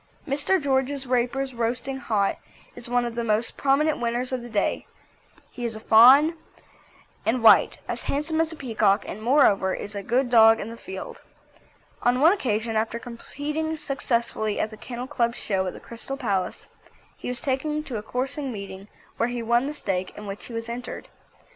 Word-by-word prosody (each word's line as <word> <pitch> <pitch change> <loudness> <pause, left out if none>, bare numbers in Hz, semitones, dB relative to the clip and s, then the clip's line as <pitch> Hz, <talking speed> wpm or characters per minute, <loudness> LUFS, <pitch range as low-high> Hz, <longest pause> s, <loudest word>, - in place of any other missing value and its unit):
Mr. 290 +7 +3
George 270 -1 0
Raper's 255 +2 0
Roasting 245 +3 -2
Hot 210 -6 0 0.4
is 235 - -5
one 245 0 +1
of 235 - -4
the 235 0 -2
most 220 +1 +1
prominent 290 +3 +2
winners 240 +2 -1
of 255 -1 -2
the 240 - -9
day; 205 -3 -1 0.6
he 245 - -8
is 230 -2 -2
a - - -7
fawn 260 +9 +7 0.9
and 230 +1 0
white, 225 - +6
as - - -4
handsome 315 +3 0
as 325 0 0
a - - -5
peacock 220 -7 +1
and, 215 - -7
moreover, 215 -7 +3
is 205 - -6
a 200 - -4
good 245 +5 0
dog 225 -1 +7
in 220 - -5
the - - -8
field. 190 -4 -8 0.8
On 245 +1 +2
one 320 +6 +6
occasion 225 - -1
after 220 +1 0
competing 295 +7 -4
successfully 235 -7 -1
at 215 - -1
the - - -9
Kennel 245 +2 -6
Club 240 -4 -1
Show 190 -2 -1
at 180 - -4
the - - -10
Crystal 240 +4 -6
Palace, 200 -8 -2 0.5
he - - -9
was 250 -1 0
taken 300 +4 -1
to 255 -7 -5
a - - -4
coursing 260 +5 -3
meeting 200 -2 -8 0.3
where 230 - +1
he 240 -1 -4
won 235 +3 +2
the 295 - -4
stake 185 -8 -3
in 210 - -8
which 200 0 -6
he 240 - -10
was 230 0 -4
entered. 240 +1 -6
240 Hz, 185 wpm, -25 LUFS, 220-270 Hz, 0.9 s, fawn